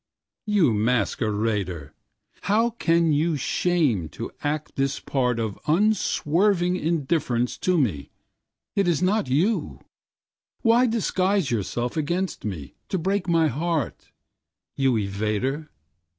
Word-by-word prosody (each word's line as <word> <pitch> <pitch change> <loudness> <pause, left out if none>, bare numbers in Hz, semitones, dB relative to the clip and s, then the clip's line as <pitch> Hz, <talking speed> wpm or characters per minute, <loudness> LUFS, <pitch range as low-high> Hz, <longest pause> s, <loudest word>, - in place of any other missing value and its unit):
You 195 - +3
masquerader! 105 - -1 0.5
How 225 +5 +2
can 170 -7 +2
you 155 +2 +1
shame 140 - +1
to - - -5
act 150 +1 -2
this 135 +1 0
partOf 120 -6 -1
unswerving 180 0 +2
indifference 150 -7 0
to 185 -1 +1
me? 95 - 0 0.7
It 195 -2 +2
is 170 -2 +1
not 190 -6 +1
you; 175 - 0 0.8
why 240 +2 +5
disguise 195 - +1
yourselfAgainst 145 - -2
me, 85 -10 -5 0.2
to 190 - 0
break 190 +2 -1
my 165 -2 +4
heart, 155 -1 -2 0.7
You 135 -2 +2
evader? 110 +8 -1
155 Hz, 105 wpm, -24 LUFS, 120-180 Hz, 0.8 s, why